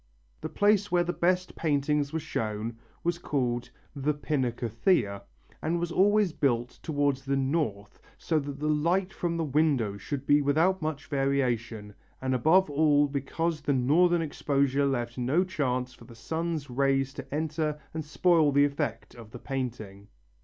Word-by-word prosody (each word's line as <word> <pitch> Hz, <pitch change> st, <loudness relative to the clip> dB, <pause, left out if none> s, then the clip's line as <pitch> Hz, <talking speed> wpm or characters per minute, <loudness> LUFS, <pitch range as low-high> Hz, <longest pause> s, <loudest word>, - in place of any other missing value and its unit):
The -, -, -5 dB
place 205 Hz, 0 st, +2 dB
where 175 Hz, -1 st, +3 dB
the 175 Hz, +1 st, -2 dB
best 180 Hz, +2 st, 0 dB
paintings 145 Hz, -2 st, 0 dB
were 160 Hz, -, -1 dB
shown 110 Hz, -6 st, -3 dB, 0.3 s
was 170 Hz, 0 st, -1 dB
called 125 Hz, -6 st, -1 dB, 0.3 s
the 145 Hz, +2 st, 0 dB
Pinacotheca, 120 Hz, -, 0 dB, 0.4 s
and 170 Hz, +2 st, 0 dB
was 170 Hz, 0 st, -2 dB
always 205 Hz, 0 st, +3 dB
built 120 Hz, -5 st, -1 dB
towards 145 Hz, -3 st, 0 dB
the 135 Hz, +1 st, 0 dB
north 130 Hz, -8 st, -2 dB, 0.2 s
so 160 Hz, -2 st, 0 dB
that 140 Hz, -1 st, -6 dB
the 150 Hz, -, -2 dB
light 170 Hz, +6 st, +1 dB
from 170 Hz, -1 st, -2 dB
the 165 Hz, -, 0 dB
windows 135 Hz, -9 st, +1 dB
should 140 Hz, +1 st, -4 dB
be 145 Hz, +1 st, +4 dB
without 160 Hz, +7 st, +2 dB
much 155 Hz, -2 st, -3 dB
variation, 120 Hz, -6 st, -1 dB, 0.3 s
and 130 Hz, 0 st, -1 dB
above 160 Hz, +9 st, +4 dB
all 145 Hz, 0 st, +3 dB
because 150 Hz, +3 st, -2 dB
a 140 Hz, -, +3 dB
northern 165 Hz, +7 st, +3 dB
exposure 140 Hz, -2 st, +1 dB
left 120 Hz, -2 st, -2 dB
no 135 Hz, +9 st, +2 dB
chance 130 Hz, -8 st, -2 dB
for -, -, -16 dB
the 120 Hz, -, -14 dB
sun's 160 Hz, +5 st, -3 dB
rays 135 Hz, +1 st, +1 dB
to 135 Hz, -1 st, -9 dB
enter 155 Hz, 0 st, -2 dB
and 160 Hz, 0 st, -3 dB
spoil 155 Hz, 0 st, +3 dB
the 140 Hz, +1 st, +5 dB
effect 140 Hz, -1 st, -3 dB
of 115 Hz, -3 st, -12 dB
the 120 Hz, -, -9 dB
painting. 115 Hz, -7 st, -5 dB
145 Hz, 160 wpm, -28 LUFS, 130-160 Hz, 0.4 s, the